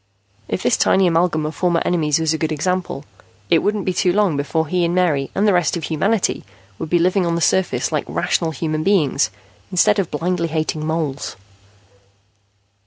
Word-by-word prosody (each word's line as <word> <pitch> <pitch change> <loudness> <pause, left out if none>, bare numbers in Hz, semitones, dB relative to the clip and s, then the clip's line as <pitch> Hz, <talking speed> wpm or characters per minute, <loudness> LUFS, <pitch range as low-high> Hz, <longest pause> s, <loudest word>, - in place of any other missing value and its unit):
If 95 - -3
this 125 - +2
tiny 190 0 +3
amalgam 165 -2 +1
of 155 - -3
former 175 -1 +1
enemies 155 -4 +1
was 160 -1 +1
a 160 - -3
good 160 -1 -1
example, 175 -2 -2 0.5
it 165 - +6
wouldn't 205 +1 -1
be 185 - 0
too 180 0 +2
long 195 -4 +2
before 155 +3 -1
he 180 +3 0
and 170 +1 0
Mary 155 -7 +1
and 200 +2 +2
the 205 - +4
rest 175 -2 +1
of 165 - -6
humanity 195 +8 0 0.4
would 160 - -5
be 175 - +3
living 185 +3 +2
on 170 -1 0
the - - 0
surface 185 +2 +1
like - - -1
rational 165 - 0
human 155 0 -2
beings 155 -7 +2 0.4
instead 205 +3 +3
of 190 - -1
blindly 170 +2 -1
hating 155 -1 -2
moles. 155 -3 -3
170 Hz, 185 wpm, -20 LUFS, 155-185 Hz, 0.5 s, it